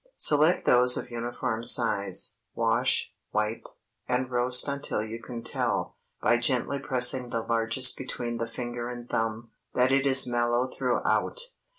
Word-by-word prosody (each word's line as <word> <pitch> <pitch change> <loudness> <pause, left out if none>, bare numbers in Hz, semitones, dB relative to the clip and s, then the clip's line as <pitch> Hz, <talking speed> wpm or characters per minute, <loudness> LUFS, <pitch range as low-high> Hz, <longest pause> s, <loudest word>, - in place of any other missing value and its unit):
Select 155 +4 +3
those 125 0 +5
of 125 - -6
uniform 120 -1 -4
size, 100 -5 0 0.2
wash, - - 0 0.2
wipe, 105 +1 -2 0.4
and 125 0 -1
roast 125 +1 +3
until 140 -6 -2
you 110 +1 -8
can 115 -1 -8
tell, - - -2 0.3
by 120 - +3
gently 130 +3 +3
pressing 125 -2 +2
the 115 -1 -3
largest 115 +3 +2
between 120 -2 -5
the 115 0 -3
finger 120 0 -6
and 120 -1 -8
thumb, 115 0 -3 0.2
that 125 +1 +2
it 135 +1 +2
is 135 0 +7
mellow 120 0 0
throughout. 130 - -1
120 Hz, 145 wpm, -27 LUFS, 115-130 Hz, 0.4 s, is